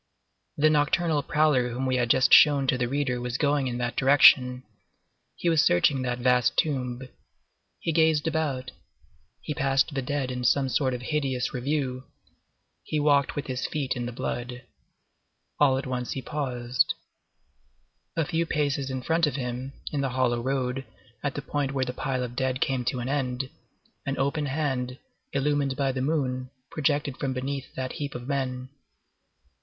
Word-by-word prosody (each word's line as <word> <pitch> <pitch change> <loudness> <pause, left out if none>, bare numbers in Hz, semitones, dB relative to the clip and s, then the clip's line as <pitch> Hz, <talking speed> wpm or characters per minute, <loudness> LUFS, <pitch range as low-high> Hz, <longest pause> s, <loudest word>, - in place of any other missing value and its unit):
The 155 +1 +4
nocturnal 150 +1 +2
prowler 150 -5 +2
whom 125 +2 -3
we 130 -1 +1
have 120 -1 +1
just 130 +2 +4
shown 145 -2 +7
to 130 - +2
the 120 -1 0
reader 130 -2 -1
was 125 0 -2
going 145 -2 +1
in 120 -1 -3
that 120 -1 -2
direction. 130 -2 +6 0.7
He - - -3
was 165 -3 +5
searching 130 +10 +3
that 125 -1 -1
vast 125 -1 +2
tomb. 130 -4 0 0.8
He 165 - -1
gazed 160 -2 +3
about. 145 -6 -1 0.7
He 150 - -4
passed 135 0 +1
the 135 - -1
dead 135 0 -2
in 125 0 -4
some 135 +2 +3
sort 130 -1 +1
of 125 - -7
hideous 135 -4 -1
review. 130 -1 -2 0.8
He 155 - -2
walked 145 -2 +3
with 145 - -3
his 130 -1 -3
feet 145 -4 -2
in 120 -1 -3
the - - -4
blood. 125 +1 -4 1.0
All 135 -3 +4
at 135 - -3
once 125 -1 -3
he 135 - -4
paused. 125 -4 -1 1.2
A 165 - +2
few 165 0 -1
paces 140 -3 0
in 130 -1 -4
front 165 +2 +2
of 145 - -2
him, 125 0 -4 0.2
in 145 - -1
the 135 - 0
hollow 120 -2 +1
road, 130 0 -1 0.4
at 145 -2 -2
the 145 - -4
point 140 -1 -2
where 135 -1 0
the 125 - -4
pile 130 -1 -2
of 120 -1 -6
dead 130 0 -1
came 130 -2 0
to 125 0 -1
an 120 - -4
end, 130 -2 -2 0.6
an 135 - -1
open 145 +2 0
hand, 130 -3 -2 0.3
illumined 140 -1 0
by 135 -2 +1
the 130 0 -3
moon, 130 -3 -1 0.2
projected 145 -3 0
from 135 -2 -2
beneath 135 +1 -4
that 130 0 -3
heap 145 -2 -5
of 120 0 -6
men. 130 -2 -2
135 Hz, 170 wpm, -26 LUFS, 125-145 Hz, 1.2 s, shown